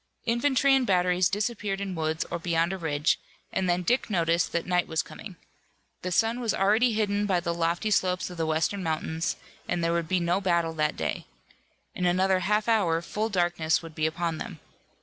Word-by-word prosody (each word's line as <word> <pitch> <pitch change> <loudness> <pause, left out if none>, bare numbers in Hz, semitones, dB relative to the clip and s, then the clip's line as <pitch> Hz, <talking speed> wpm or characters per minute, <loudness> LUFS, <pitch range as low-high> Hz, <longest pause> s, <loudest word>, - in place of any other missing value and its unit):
Infantry 265 +3 +3
and 265 -2 +3
batteries 180 -1 +3
disappeared 205 -1 -2
in 200 -1 -3
woods 160 -1 -1
or 170 - -2
beyond 170 +1 0
a - - -3
ridge, 150 -2 +1 0.3
and 185 -1 0
then 175 +1 +1
Dick 245 +7 +1
noticed 170 -3 +1
that 170 - -1
night 180 -1 +1
was 160 -1 0
coming. 190 - -10 0.7
The 185 - -3
sun 225 +5 +2
was 235 -3 0
already 220 +5 +3
hidden 205 -1 0
by 185 -3 +2
the 170 0 -2
lofty 170 +5 0
slopes 185 -2 +1
of 180 - -9
the 165 -1 -1
western 160 +5 0
mountains, 160 0 -2 0.3
and 175 -1 0
there 165 0 +1
would 170 -1 -1
be 185 +2 +1
no 175 +3 +1
battle 170 -3 +1
that 150 -1 0
day. - - -3 0.7
In 180 - 0
another 185 +1 +3
half 210 +4 +1
hour 195 -8 +3
full 215 +5 -2
darkness 175 -4 +1
would 165 -1 -9
be 155 0 0
upon 165 0 -2
them. - - -7
180 Hz, 195 wpm, -27 LUFS, 165-205 Hz, 0.7 s, Infantry